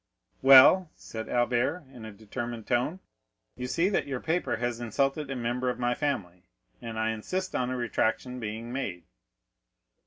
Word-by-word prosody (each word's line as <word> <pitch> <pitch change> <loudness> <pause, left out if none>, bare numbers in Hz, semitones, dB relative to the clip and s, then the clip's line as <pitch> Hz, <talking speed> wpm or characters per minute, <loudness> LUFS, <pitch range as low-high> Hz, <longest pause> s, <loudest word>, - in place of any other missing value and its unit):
"Well," 135 +7 +8
said 110 -1 -8
Albert 125 +7 +1
in 120 -3 -10
a 110 - -7
determined 115 +2 -6
tone, 130 +10 0 0.5
"you 125 +1 -5
see 165 +7 +1
that 200 - 0
your 135 -3 -3
paper 165 +6 -1
has 120 0 -2
insulted 135 +5 -1
a 135 - -3
member 125 +1 -1
of 125 - -2
my 120 0 +1
family, 100 - -3 0.4
and 115 -2 -6
I 110 0 +1
insist 185 - -3
on 125 0 0
a 130 - -2
retractation 125 +1 -1
being 115 +2 -5
made." 95 -10 -4
125 Hz, 160 wpm, -28 LUFS, 115-135 Hz, 0.5 s, Well